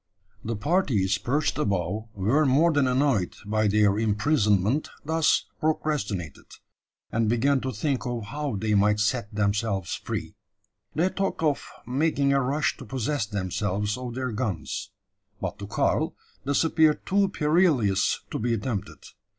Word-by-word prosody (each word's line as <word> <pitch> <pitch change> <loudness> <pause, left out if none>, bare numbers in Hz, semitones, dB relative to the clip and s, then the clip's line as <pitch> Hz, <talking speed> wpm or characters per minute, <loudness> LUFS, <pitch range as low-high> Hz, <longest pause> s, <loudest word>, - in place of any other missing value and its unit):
The 115 +1 -2
parties 105 - +1
perched 145 +5 0
above 100 - -1
were 110 +11 +2
more 150 +5 +4
than 145 -3 +3
annoyed 125 -7 +1
by 110 +1 +1
their 105 0 +3
imprisonment 110 - +2 0.2
thus 160 +1 +2
procrastinated, 140 - -2 0.6
and 115 -1 +1
began 130 +4 +2
to 130 - -2
think 130 +3 -2
of 120 -2 -3
how 140 +3 -4
they 105 +2 -1
might 105 +1 +3
set 110 +1 0
themselves 100 -3 -1
free. - - -4 0.6
They 175 +4 +2
talked 195 -4 -2
of 150 -3 0 0.2
making 140 +1 +1
a 140 - +3
rush 140 +4 0
to 130 - -10
possess 130 +1 -2
themselves 105 +1 -2
of 125 -2 -6
their 130 -1 -2
guns; 105 -6 -3 0.5
but 95 +2 -4
to 100 - -6
Karl - - 0 0.3
this 140 +3 +2
appeared 160 -1 +3
too 195 0 +2
perilous 150 - +2
to - - -2
be 115 +1 +1
attempted. 105 -2 -4
115 Hz, 140 wpm, -26 LUFS, 105-145 Hz, 0.6 s, more